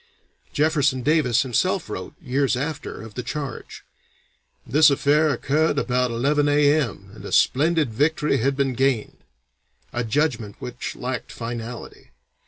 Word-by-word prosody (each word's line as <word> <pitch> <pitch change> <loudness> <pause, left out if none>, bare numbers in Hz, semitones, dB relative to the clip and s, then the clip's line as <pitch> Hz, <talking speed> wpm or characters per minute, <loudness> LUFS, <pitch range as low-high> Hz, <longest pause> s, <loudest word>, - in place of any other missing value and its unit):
Jefferson 145 -4 +1
Davis 140 -5 +3
himself 185 - 0
wrote, - - -7
years 135 -3 0
after, 150 -3 -5
of 110 -2 -11
the 125 - -4
charge: 135 0 -6 0.8
"This 150 +2 +5
affair 145 +2 +3
occurred 145 +3 +1
about 125 -2 +1
11 145 +5 +1
A.M., 145 -9 +1
and 110 - -12
a - - -7
splendid 150 -2 +2
victory 150 +4 +1
had 135 +3 0
been 135 -2 +1
gained," 130 -3 0 0.8
a 120 - -1
judgment 115 -4 -1
which 125 0 -6
lacked 125 -1 -5
finality. 115 0 -7
135 Hz, 130 wpm, -23 LUFS, 120-150 Hz, 0.8 s, This